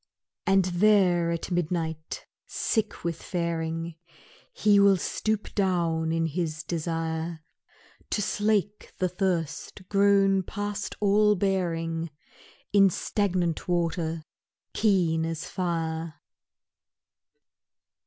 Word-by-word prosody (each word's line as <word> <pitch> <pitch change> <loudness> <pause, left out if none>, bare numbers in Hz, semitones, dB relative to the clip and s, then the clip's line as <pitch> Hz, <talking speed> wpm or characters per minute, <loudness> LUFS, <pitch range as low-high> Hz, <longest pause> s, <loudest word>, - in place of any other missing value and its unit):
And 195 -1 +4
there 180 -2 +3
at 170 +2 -3
midnight 160 -2 -2 0.2
sick 220 -2 -1
with 165 -1 -3
faring, 165 -1 -3 0.5
He 205 -1 +4
will 200 -1 +6
stoop 215 +4 -2
down 170 -5 +1
in 165 0 +1
his 160 -1 -2
desire 165 -1 -3 0.7
To - - 0
slake 210 0 0
the 185 - +1
thirst 180 -1 -2
grown 195 -1 +4
past 205 +1 -4
all 210 +1 +4
bearing 170 -4 -1 0.6
In 195 -1 +7
stagnant 180 -3 -1
water 165 -2 -1 0.5
keen 175 -7 +2
as 165 -1 -3
fire. 165 -2 -2
175 Hz, 95 wpm, -27 LUFS, 165-195 Hz, 0.7 s, In